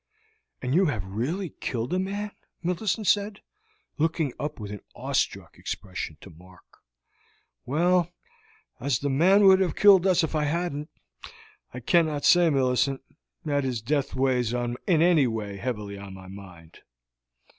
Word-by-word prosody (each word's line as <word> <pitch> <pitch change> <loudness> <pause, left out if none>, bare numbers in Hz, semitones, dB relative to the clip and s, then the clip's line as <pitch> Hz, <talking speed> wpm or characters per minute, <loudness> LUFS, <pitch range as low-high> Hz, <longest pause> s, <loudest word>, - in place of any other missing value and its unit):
"And 125 +1 -1
you 185 +3 +4
have 105 -10 -2
really 140 - -3
killed 120 +6 -3
a 185 - +1
man?" 205 +2 -3 0.3
Millicent 190 +4 -1
said, 205 +1 +1 0.6
looking 160 -3 0
up 150 -2 -4
with 105 -2 -6
an 105 - -6 0.2
awestruck - - -2
expression 90 -5 -5
to 95 - -12
Mark. 90 +3 -19 0.9
"Well, 175 +5 +2 0.7
as 130 -1 0
the 140 +2 -2
man 185 +9 +5
would 190 -1 +7
have 180 -5 0
killed 195 -2 +6
us 185 -3 +3
if 160 - -2
I 155 -1 +1
hadn't, 150 -1 -2 0.8
I - - -8
cannot 160 -5 +2
say, 175 -1 +6
Millicent, 135 -1 +1 0.4
that 145 -2 0
his 125 -3 -2
death 140 +5 -1
weighs 125 -3 +1
in 120 0 -2
any 165 -5 +4
way 105 -3 -4
heavily 105 -4 -5
on 100 -1 -9
my 95 -1 -12
mind. 90 -4 -13
145 Hz, 145 wpm, -26 LUFS, 115-175 Hz, 0.9 s, would